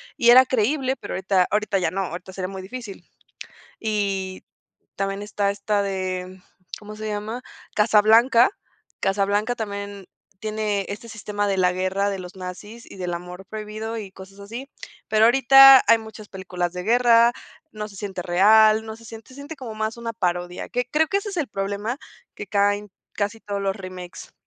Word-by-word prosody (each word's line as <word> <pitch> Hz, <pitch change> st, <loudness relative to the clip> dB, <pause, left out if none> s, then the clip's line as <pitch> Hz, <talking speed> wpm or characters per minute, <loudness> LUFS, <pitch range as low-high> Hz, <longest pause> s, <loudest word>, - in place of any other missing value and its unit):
Y 235 Hz, -, +3 dB
era 255 Hz, +2 st, +9 dB
creíble. 260 Hz, +3 st, 0 dB
Pero -, -, -8 dB
ahorita 190 Hz, -1 st, +2 dB
ahorita, 210 Hz, -1 st, +1 dB
ya 175 Hz, -3 st, 0 dB
no. 195 Hz, +1 st, -2 dB
Ahorita 180 Hz, +2 st, -7 dB
sería 185 Hz, -1 st, -4 dB
muy 190 Hz, 0 st, -7 dB
difícil. 205 Hz, +1 st, -9 dB, 0.7 s
Y 195 Hz, -3 st, -2 dB, 0.5 s
también 195 Hz, +1 st, -2 dB
está, 205 Hz, -1 st, -1 dB
esta 205 Hz, +1 st, -1 dB
de, 185 Hz, -1 st, -4 dB, 0.4 s
¿cómo 210 Hz, 0 st, -10 dB
se 215 Hz, 0 st, -6 dB
llama? 215 Hz, +3 st, -4 dB, 0.4 s
Casablanca. 225 Hz, +3 st, +5 dB, 0.5 s
Casablanca, 205 Hz, +4 st, +1 dB
también 200 Hz, -3 st, -6 dB, 0.3 s
tiene 215 Hz, -2 st, -2 dB
este 210 Hz, +3 st, -7 dB
sistema 210 Hz, -2 st, -3 dB
de 195 Hz, -, 0 dB
la 180 Hz, -1 st, +3 dB
guerra, 185 Hz, +2 st, 0 dB
de 195 Hz, -, -4 dB
los 180 Hz, -1 st, -9 dB
nazis, 200 Hz, +5 st, -9 dB
y -, -, -11 dB
del 180 Hz, -2 st, -3 dB
amor 180 Hz, +2 st, -8 dB
prohibido, 215 Hz, +2 st, -6 dB
y 205 Hz, -3 st, -7 dB
cosas 195 Hz, +1 st, -13 dB
así. 230 Hz, +7 st, -8 dB, 0.4 s
Pero 220 Hz, 0 st, +5 dB
ahorita, 270 Hz, +2 st, +8 dB
hay 230 Hz, -, +7 dB
muchas 220 Hz, -1 st, -11 dB
películas 180 Hz, -2 st, -4 dB
de 180 Hz, 0 st, -5 dB
guerra. 235 Hz, +1 st, +5 dB, 0.4 s
No 215 Hz, -1 st, -5 dB
se 200 Hz, -, -15 dB
siente 190 Hz, -2 st, -5 dB
real, 215 Hz, +5 st, +5 dB
no 220 Hz, 0 st, -7 dB
se 230 Hz, -, -17 dB
siente 225 Hz, 0 st, -11 dB
Se -, -, -13 dB
siente 285 Hz, +3 st, -8 dB
como 245 Hz, -5 st, -7 dB
más 220 Hz, +1 st, -2 dB
una 235 Hz, -1 st, -5 dB
parodia. 180 Hz, -3 st, -3 dB
Que 245 Hz, -1 st, -2 dB
creo 315 Hz, +1 st, +3 dB
que 395 Hz, -, +1 dB
ese 400 Hz, -, -6 dB
es 390 Hz, -, -7 dB
el 305 Hz, -, 0 dB
problema, 205 Hz, +4 st, -3 dB, 0.4 s
que 205 Hz, -, -7 dB
caen 205 Hz, 0 st, +1 dB, 0.2 s
casi 205 Hz, +2 st, -2 dB
todos 200 Hz, -1 st, -4 dB
los 195 Hz, 0 st, -1 dB
remakes, 185 Hz, -3 st, -9 dB
205 Hz, 175 wpm, -23 LUFS, 190-225 Hz, 0.7 s, era